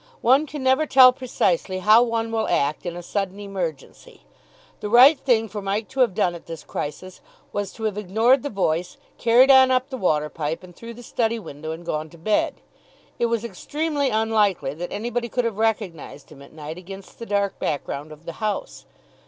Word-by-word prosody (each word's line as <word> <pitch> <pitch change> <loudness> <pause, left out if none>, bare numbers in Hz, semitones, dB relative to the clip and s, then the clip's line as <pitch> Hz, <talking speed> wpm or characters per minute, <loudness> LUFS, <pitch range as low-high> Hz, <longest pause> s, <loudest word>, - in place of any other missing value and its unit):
One 270 +6 +4
can 295 -2 -6
never 265 +4 +3
tell 255 -2 +7
precisely 195 -7 -1
how 215 +5 +6
one 230 -1 -1
will 225 -1 -1
act 145 +5 0
in 175 - -4
a 175 - -7
sudden 195 +1 -3
emergency. 180 - -6 0.6
The 210 - -5
right 260 +6 +7
thing 225 -4 +2
for 210 -1 -6
Mike 200 +3 -2
to 265 - -7
have 240 -8 +3
done 185 -5 +1
at 170 - -11
this 165 -2 -8
crisis 180 +6 -6 0.3
was 205 -1 -3
to 225 - -10
have 210 -2 -1
ignored 225 +7 +3
the 285 - -4
voice, 180 - -1 0.2
carried 245 +4 +5
on 265 -1 +7
up 260 +2 +1
the 260 - -4
water 155 -8 +1
pipe, 155 +2 -4
and 180 -1 -14
through 230 0 -10
the 245 - -12
study 230 0 -1
window, 155 -7 -8
and 165 +2 -8
gone 155 -1 -3
to 170 - -16
bed. 210 +6 0 0.6
It 235 - +2
was 230 -1 -1
extremely 295 +3 -2
unlikely 210 -10 +1
that 175 +4 -6
anybody 235 +2 -3
could 245 0 -1
have 220 -3 -3
recognised 195 -11 -3
him 140 -2 -14
at 140 - -14
night 155 +2 -8
against 195 +1 -11
the 230 - -7
dark 200 -1 -1
background 145 0 -4
of 155 +2 -14
the 170 - -6
house. 215 - -4
210 Hz, 200 wpm, -23 LUFS, 170-235 Hz, 0.6 s, tell